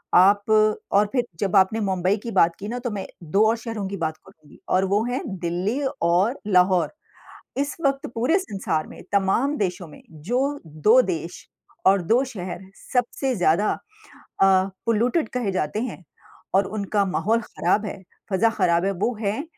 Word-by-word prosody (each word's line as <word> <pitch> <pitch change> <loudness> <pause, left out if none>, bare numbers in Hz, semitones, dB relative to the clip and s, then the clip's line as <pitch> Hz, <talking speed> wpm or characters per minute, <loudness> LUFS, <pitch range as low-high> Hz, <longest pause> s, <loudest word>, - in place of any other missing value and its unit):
आप 200 +3 +6 0.5
और 205 +1 +4
फिर 250 -2 +1 0.2
जब 200 -1 0
आपने 195 +4 +4
मुंबई 185 +1 +1
की 235 - -4
बात 170 -4 +3
की 205 - -6
ना 245 +3 -3
तो 245 0 -3
मैं 200 -2 -4 0.2
2 195 +7 +2
और 230 - +1
शहरों 225 -3 -5
की 200 - -5
बात 160 -2 -2
करुँगी 155 -6 -19
और 185 +1 +3
वो 210 - +3
हैं 245 +1 -2 0.2
दिल्ली 185 +10 -1 0.2
और 180 +10 +2
लाहौर। 180 -3 +3 0.7
इस 285 +1 -2
वक़्त 275 +2 0
पूरे 255 +11 +2
संसार 195 - -3
में - - -12
तमाम 200 +9 +2
देशों 180 -4 -2
में - - -14 0.3
जो 250 - +2 0.3
2 160 +11 +4
देश 170 +1 -6 0.4
और 195 0 +5
2 230 +9 +3
शहर 185 -8 -6 0.3
सबसे 255 +1 0
ज़्यादा 175 +3 +2
अ, - - -6 1.1
पॉल्यूटेड 230 +6 +1
कहे 245 -5 0
जाते 185 +3 -1
हैं 245 -7 -6 0.5
और 195 +1 +4
उनका 205 0 -1
माहौल 220 +5 +1
ख़राब 210 0 0
है, 195 -1 -7 0.3
फ़ज़ा 215 +4 +3
ख़राब 180 -5 +1
है, 195 - +1
वो 200 +6 -1
हैं 215 +6 -1
200 Hz, 170 wpm, -23 LUFS, 185-230 Hz, 1.1 s, आप